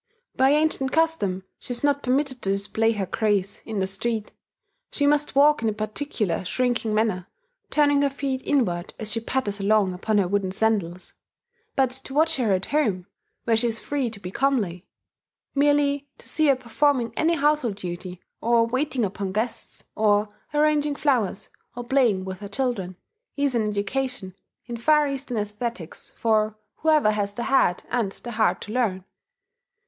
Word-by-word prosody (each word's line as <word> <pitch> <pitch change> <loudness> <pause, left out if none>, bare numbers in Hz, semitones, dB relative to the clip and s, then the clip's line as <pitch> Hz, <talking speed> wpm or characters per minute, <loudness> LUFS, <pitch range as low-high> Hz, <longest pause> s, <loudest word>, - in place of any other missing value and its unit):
By 265 +1 +4
ancient 295 -3 +2
custom, 320 - +1 0.2
she 245 - -5
is 240 - -5
not 285 -1 +2
permitted 260 0 0
to 195 - -1
display 210 +3 +1
her 200 -3 -2
grace 205 0 0
in 220 -2 -4
the 190 - +1
street: 210 +3 -3 0.6
she 285 - +1
must 295 0 +2
walk 290 -1 +5
in 225 - +1
a - - -1
particular 215 - -2
shrinking 245 +2 0
manner, 215 -5 0 0.4
turning 290 -1 +3
her 285 - +3
feet 270 -1 -3
inward 180 -11 0
as 215 -1 -3
she 230 - +1
patters 225 -3 -2
along 200 -1 +2
upon 210 +4 0
her 195 -3 +3
wooden 195 0 0
sandals. 190 -4 -1 0.6
But 265 -2 +2
to 265 +1 -6
watch 320 +1 +3
her 235 -6 +1
at 185 0 +1
home, 215 -12 0 0.4
where 230 - +2
she 230 +2 +2
is 225 -1 +1
free 280 -4 -2
to 220 -2 -8
be 180 -2 -7
comely, 205 -9 0 0.7
merely 285 0 +2
to - - -13
see 310 -1 +2
her 275 - +5
performing 250 -1 +1
any 330 +2 +2
household 295 -8 +1
duty, 180 -1 -7 0.2
or 235 0 +3
waiting 255 0 0
upon 195 0 -4
guests, 220 +4 -4
or 210 -1 +3 0.2
arranging 295 -1 +2
flowers, 245 -10 0 0.3
or 245 - -5
playing 240 -7 +2
with 190 -1 -6
her 200 0 -8
children, 200 -6 -2 0.4
is 280 -2 +1
an 220 -3 +1
education 210 -1 -2 0.3
in 240 0 -5
Far 300 +5 +4
Eastern 270 -3 -4
aesthetics 210 -3 -5
for 215 -1 +1 0.2
whoever 305 -8 +3
has 205 -1 -2
the 235 - -3
head 235 -10 +2
and 225 -6 0
the 240 - -8
heart 220 -1 +1
to 210 - -7
learn.... 210 -7 0
230 Hz, 170 wpm, -24 LUFS, 200-275 Hz, 0.7 s, walk